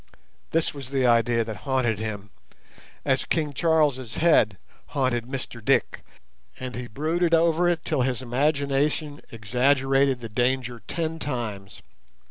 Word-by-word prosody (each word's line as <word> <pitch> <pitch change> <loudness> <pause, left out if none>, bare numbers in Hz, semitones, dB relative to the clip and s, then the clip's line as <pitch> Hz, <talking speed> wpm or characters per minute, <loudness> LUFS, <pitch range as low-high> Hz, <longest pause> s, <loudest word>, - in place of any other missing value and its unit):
This 165 0 +1
was 135 -3 -7
the 135 -2 +1
idea 115 -1 +3
that 110 -2 -6
haunted 120 -3 0
him, 105 -2 -5 0.7
as - - +2
King 150 -3 -1
Charles's 145 -7 +1
head 130 - +4 0.3
haunted 130 -4 0
Mr 125 -3 -6
Dick, - - +1 0.6
and 130 -1 -5
he 125 0 -5
brooded 165 +7 +1
over 165 +1 +3
it 170 -2 -1
till - - 0
his 130 0 -1
imagination 145 +3 0
exaggerated 135 +4 +2
the 115 - -6
danger 125 +1 -1
ten 165 -1 -3
times. 110 -9 -5
130 Hz, 130 wpm, -25 LUFS, 120-150 Hz, 0.7 s, head